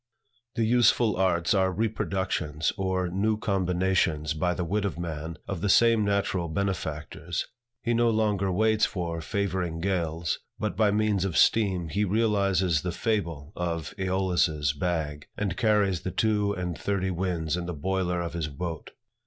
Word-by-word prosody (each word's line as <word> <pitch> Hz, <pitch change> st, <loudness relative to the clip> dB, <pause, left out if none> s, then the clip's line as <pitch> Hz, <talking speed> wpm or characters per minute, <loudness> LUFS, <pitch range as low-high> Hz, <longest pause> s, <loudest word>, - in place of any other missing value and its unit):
The 115 Hz, -, +1 dB
useful 120 Hz, -2 st, +4 dB
arts 90 Hz, 0 st, +2 dB
are 95 Hz, -2 st, +2 dB
reproductions 95 Hz, -7 st, -1 dB
or 95 Hz, -2 st, -1 dB
new 105 Hz, +5 st, 0 dB
combinations 90 Hz, -6 st, +1 dB
by 90 Hz, +3 st, 0 dB
the 90 Hz, -, -2 dB
wit 100 Hz, +5 st, 0 dB
of 100 Hz, -4 st, -2 dB
man, 80 Hz, -1 st, -5 dB
of 95 Hz, -4 st, -4 dB
the 100 Hz, -, 0 dB
same 115 Hz, +1 st, +5 dB
natural 100 Hz, -3 st, 0 dB
benefactors. 85 Hz, -2 st, -3 dB, 0.4 s
He 120 Hz, -, +1 dB
no 120 Hz, 0 st, +3 dB
longer 105 Hz, -4 st, +1 dB
waits 110 Hz, +3 st, +2 dB
for 85 Hz, -3 st, -1 dB
favoring 95 Hz, -4 st, -2 dB
gales, 85 Hz, -3 st, -1 dB, 0.2 s
but 110 Hz, -1 st, -2 dB
by 110 Hz, -2 st, +3 dB
means 105 Hz, -2 st, +1 dB
of 95 Hz, -4 st, -1 dB
steam, 95 Hz, -7 st, +3 dB
he 100 Hz, +7 st, 0 dB
realizes 100 Hz, -5 st, +2 dB
the 90 Hz, -, -2 dB
fable 85 Hz, -7 st, -2 dB
of 85 Hz, -3 st, -3 dB
Aeolus's 90 Hz, -6 st, +1 dB
bag, 75 Hz, -2 st, -2 dB
and 100 Hz, -4 st, -1 dB
carries 100 Hz, -4 st, +2 dB
the -, -, -3 dB
two 105 Hz, +1 st, +1 dB
and 90 Hz, -3 st, -3 dB
thirty 95 Hz, 0 st, -1 dB
winds 85 Hz, -3 st, -1 dB
in 90 Hz, -1 st, -4 dB
the 90 Hz, -, -3 dB
boiler 90 Hz, +2 st, -1 dB
of 85 Hz, -1 st, -4 dB
his 85 Hz, -3 st, -2 dB
boat. 80 Hz, +2 st, -6 dB
95 Hz, 155 wpm, -27 LUFS, 85-100 Hz, 0.4 s, same